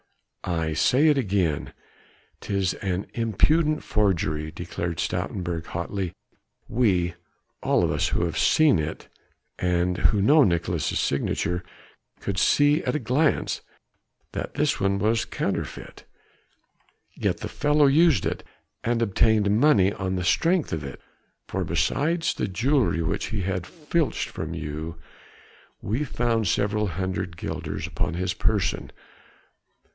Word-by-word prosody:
"I 80 -3 -1
say 130 - +3
it 150 - +3
again, 95 - 0 0.7
'tis 100 -2 -1
an 95 -1 -2
impudent 150 - +2
forgery," 80 -7 0
declared 85 +1 -4
Stoutenburg 85 -3 -2
hotly, 85 +1 -3 0.5
"we 90 -8 +1 0.5
all - - +2
of - - +1
us - - +1
who 85 - 0
have 80 -2 -3
seen 155 - +4
it 75 0 -4 0.5
and 90 0 +1
who 105 - +1
know 145 +10 +6
Nicolaes' 85 - 0
signature 90 +1 -1 0.6
could 100 -1 -2
see 145 +7 +4
at - - -1
a - - +1
glance 140 +6 +1 0.7
that - - -5
this 145 0 +1
one 100 0 +1
was 110 +3 +1
counterfeit. - - -4 1.1
Yet - - -1
the - - -3
fellow 150 0 +2
used 145 - +4
it, - - -2 0.4
he 115 - -2
obtained 110 -2 +2
money 100 -9 +4
on 95 -1 -3
the 90 - -2
strength 165 - +2
of 80 -2 -3
it, 70 - -7 0.5
for - - -2
beside 165 +4 0
the 130 - 0
jewelry 115 - +1
which 80 - -2
he 110 -4 -3
had 95 -1 -2
filched 160 -1 -1
from 80 +1 -5
you, 80 +1 -5 0.9
we 115 +9 -1
found 115 -5 0
several 105 +4 +1
hundred 90 -1 -3
guilders - - -4
upon - - -2
his 90 +1 -1
person. 105 -2 0
100 Hz, 130 wpm, -25 LUFS, 85-130 Hz, 1.1 s, know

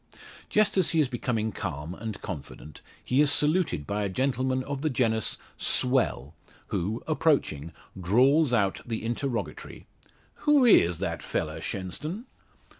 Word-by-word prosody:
Just 210 -1 +2
as 180 - +3
he 165 - +1
is 150 - +3
becoming 120 -3 -2
calm, 85 -4 -5
and 110 0 -6
confident, 75 -3 -8 0.2
he 130 +3 +2
is 150 -1 +4
saluted 150 - +1
by 100 +4 -2
a 100 - -1
gentleman 130 +4 0
of 140 0 -5
the 155 - +1
genus 115 -4 0 0.2
"swell," 125 - +1 0.4
who, 105 +7 -2
approaching, 140 - +1 0.3
drawls 130 - +4
out 100 -5 +1
the 115 -2 -4
interrogatory: 115 - -4 0.6
"Who 290 -3 +6
is 90 - +5
that - - -3
fella, - - -3
Shenstone?" 150 - -5
120 Hz, 135 wpm, -27 LUFS, 95-145 Hz, 0.6 s, Who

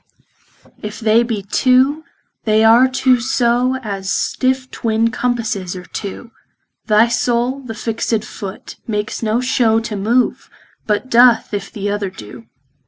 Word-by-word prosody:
If 210 0 -7
they 225 +1 +3
be 225 -4 -3
two, 260 +8 +2 0.4
they 215 0 +3
are 230 +3 +6
two 260 -1 +2
so 245 +1 +1
As 195 -3 -4
stiffe 260 +3 -1
twin 225 0 0
compasses 225 -7 -2
are 180 0 -8
two, 220 +5 -7 0.6
Thy 215 +1 +5
soule 240 +2 0
the 245 -5 -8
fixt 225 -1 -2
foot, 195 -3 -9
makes 210 -1 -3
no 225 +1 0
show 240 -3 +2
To 225 -1 -5
move, 230 +5 0 0.4
but 215 +4 -1
doth, 240 -2 +5
if 200 -1 -4
th' 205 -3 -6
other 205 -1 -2
doe. 115 - -12
225 Hz, 140 wpm, -17 LUFS, 210-250 Hz, 0.6 s, are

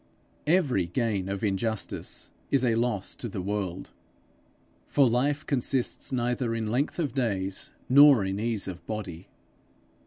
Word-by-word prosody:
Every 145 - +2
gain 100 -1 -1
of 100 +1 -3
injustice 110 +1 -2 0.2
is 135 -2 +3
a 115 - +3
loss 115 -4 0
to 120 - -4
the 100 - -5
world; 95 -1 -3 1.0
for 140 -2 +4
life 140 +6 +1
consists 130 -1 0
neither 120 -1 0
in 110 -2 -2
length 135 +5 0
of 150 -8 -1
days 100 -7 -2 0.2
nor 140 -5 +7
in 95 +1 -2
ease 110 -3 -1
of 90 -2 -7
body. 95 -5 -5
115 Hz, 135 wpm, -27 LUFS, 100-130 Hz, 1.0 s, nor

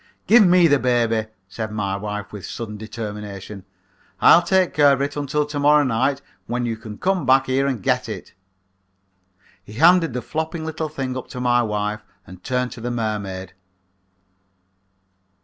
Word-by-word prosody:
"'Give 230 0 +7
me 180 -2 +5
the 145 -3 +3
baby,' 115 -3 +1 0.2
said 110 +2 -5
my 100 -2 -2
wife, 105 0 -5
with 100 -3 -8
sudden 115 -3 -6
determination. 105 -2 -7 0.5
'I'll 170 - +7
take 185 0 +1
care 145 -1 +5
of 135 - -1
it 140 +1 -2
until 145 +1 -1
to 145 0 -5
morrow 150 +1 +5
night 135 +2 0 0.2
when 120 +1 -2
you 115 -1 -2
can 110 -2 -10
come 185 -2 0
back 130 +1 +4
here 135 +1 +1
and 125 -8 -3
get - - 0
it.' - - -8 1.3
"He 105 - -13
handed 165 +3 +4
the 125 - -4
flopping 160 +1 -4
little 160 0 -4
thing 135 -4 -4
up 130 - -6
to 125 - -8
my 120 -1 +2
wife 105 -1 -2 0.2
and 90 +1 -13
turned 125 0 -1
to 115 - -9
the 120 - -3
mermaid. 100 -5 -4
125 Hz, 165 wpm, -21 LUFS, 105-145 Hz, 1.3 s, Give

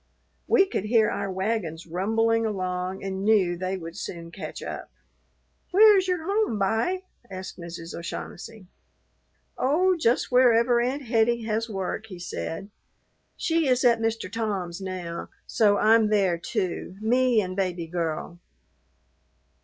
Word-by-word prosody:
We 415 -4 +5
could 295 - -3
hear 220 -1 +3
our 195 - -3
wagons 190 -4 -2
rumbling 225 +6 +1
along 185 -3 -3
and 190 0 -3
knew 200 -5 +3
they 185 +2 -3
would 165 -1 -8
soon 170 -4 -7
catch - - -7
up. - - -6 0.8
"Where 420 +3 +7
is 375 -1 +2
your 360 -3 -1
home, 400 - 0
b'y?" 225 - 0 0.3
asked 185 -1 -7
Mrs. 170 -1 -8
O'Shaughnessy. 185 +4 -7 0.9
"Oh, 360 +8 +3
just 255 -8 +1
wherever 240 -1 +5
Aunt 265 +4 -1
Hettie 235 -1 +2
has 225 +1 -1
work," 195 +2 -4
he 185 -4 -9
said. 175 +2 -5 0.7
"She 325 -2 +1
is 255 0 +2
at 235 -2 +4
Mr. 225 0 -1
Tom's 200 -5 -3
now, 180 -3 -5 0.2
so 205 -2 +3
I'm 220 0 +5
there, 195 -5 +2
too, 185 -1 -3
me 245 +2 +3
and 185 -3 -2
Baby 180 -3 -1
Girl." 170 0 -3
215 Hz, 140 wpm, -26 LUFS, 185-235 Hz, 0.9 s, Where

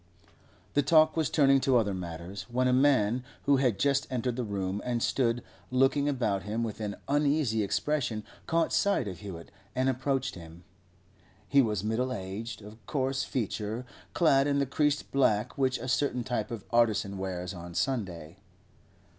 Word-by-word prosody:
The 145 - +4
talk 155 +2 +5
was 160 -3 +1
turning 135 -3 +4
to 130 -1 +4
other 105 -4 +1
matters, 90 +1 -6
when 125 +1 +1
a 125 - +3
man 125 -3 +3 0.2
who 140 -1 +4
had 125 -6 +2
just 140 +4 +1
entered 125 -1 -1
the 125 - -2
room 100 -2 -3
and 120 -2 -1
stood 120 -2 +1 0.3
looking 135 +3 +3
about 110 -8 0
him 105 +4 -2
with 110 -2 -4
an 105 -1 -3
uneasy 145 -5 +2
expression 120 +1 -1 0.2
caught 165 0 +1
sight 200 - +2
of 95 -3 -6
Hewett 90 -5 -8 0.2
and 130 +1 +2
approached 130 0 -1
him. 85 0 -11 0.8
He 140 - +5
was 105 -6 -1
middle 115 +4 0
aged, 105 +1 -5 0.2
coarse 135 -1 0
of - - -9
feature, 110 0 -3 0.3
clad 140 -5 +4
in 140 -1 +1
the 140 - +2
creased 145 +2 0
black 110 -6 +2
which 130 -1 +1
a 130 - -6
certain 130 -1 0
type 115 -4 -2
of 115 -4 -6
artisan 110 -4 +2
wears 90 0 -4
on 85 -1 -9
Sunday. 90 - -2
120 Hz, 165 wpm, -29 LUFS, 100-135 Hz, 0.8 s, talk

